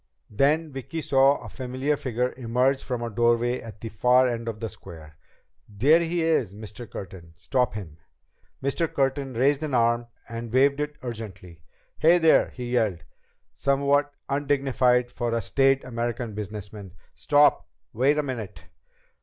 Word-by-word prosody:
Then 150 Hz, +8 st, +2 dB
Vicki 135 Hz, +5 st, -6 dB
saw 135 Hz, +1 st, +4 dB
a -, -, -8 dB
familiar 130 Hz, +3 st, -2 dB
figure 125 Hz, -2 st, -2 dB
emerge 125 Hz, +2 st, 0 dB
from 125 Hz, -2 st, -3 dB
a 120 Hz, -, -3 dB
doorway 120 Hz, +2 st, +1 dB
at 110 Hz, -3 st, -11 dB
the 115 Hz, -, -5 dB
far 125 Hz, +4 st, +4 dB
end 115 Hz, -1 st, -3 dB
of 110 Hz, -2 st, -4 dB
the 115 Hz, -, -3 dB
square. 80 Hz, -6 st, -12 dB, 0.5 s
"There 135 Hz, +11 st, +4 dB
he 170 Hz, 0 st, -1 dB
is, 130 Hz, -, +1 dB
Mr. 110 Hz, +2 st, -9 dB
Curtin! 85 Hz, -4 st, -9 dB
Stop 125 Hz, +8 st, -1 dB
him!" 85 Hz, -8 st, -8 dB, 0.7 s
Mr. 155 Hz, +4 st, 0 dB
Curtin 135 Hz, -1 st, -1 dB
raised 135 Hz, +4 st, +2 dB
an 150 Hz, -4 st, -2 dB
arm 120 Hz, 0 st, +2 dB, 0.2 s
and 115 Hz, 0 st, -6 dB
waved 140 Hz, +3 st, +3 dB
it 150 Hz, 0 st, -3 dB
urgently. 95 Hz, -8 st, -8 dB, 0.4 s
"Hey, 170 Hz, +3 st, +6 dB
there!" 165 Hz, -2 st, +4 dB
he 125 Hz, -1 st, -7 dB
yelled, 100 Hz, -9 st, 0 dB, 0.5 s
somewhat 140 Hz, +1 st, +1 dB, 0.2 s
undignified 135 Hz, -3 st, +1 dB
for 120 Hz, -1 st, -2 dB
a 115 Hz, -, 0 dB
staid 135 Hz, +4 st, +2 dB
American 120 Hz, -2 st, -3 dB
businessman. 105 Hz, -2 st, -7 dB, 0.2 s
"Stop! 145 Hz, 0 st, +3 dB, 0.3 s
Wait 135 Hz, +6 st, +2 dB
a 150 Hz, -, +1 dB
minute!" 110 Hz, -10 st, -6 dB
125 Hz, 150 wpm, -25 LUFS, 110-140 Hz, 0.7 s, Hey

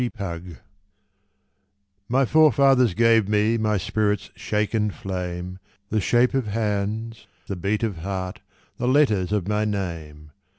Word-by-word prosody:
Driftwood 90 Hz, -8 st, -5 dB, 1.5 s
My 135 Hz, +3 st, +3 dB
forefathers 135 Hz, -, +4 dB
gave 115 Hz, -3 st, +4 dB
me 105 Hz, +2 st, +2 dB
My 105 Hz, -1 st, +1 dB
spirit's 105 Hz, +2 st, -1 dB
shaken 105 Hz, +2 st, -1 dB
flame, 90 Hz, -1 st, -5 dB, 0.3 s
The 110 Hz, 0 st, 0 dB
shape 120 Hz, +5 st, +2 dB
of 135 Hz, -4 st, 0 dB
hands, 110 Hz, +1 st, -3 dB, 0.2 s
the 100 Hz, -, -4 dB
beat 100 Hz, +5 st, -1 dB
of 105 Hz, -6 st, -2 dB
heart, 95 Hz, +1 st, -5 dB, 0.4 s
The 125 Hz, -1 st, -2 dB
letters 115 Hz, -9 st, +3 dB
of 105 Hz, -3 st, -1 dB
my 105 Hz, 0 st, 0 dB
name. 80 Hz, -8 st, -5 dB
105 Hz, 125 wpm, -23 LUFS, 95-115 Hz, 1.5 s, forefathers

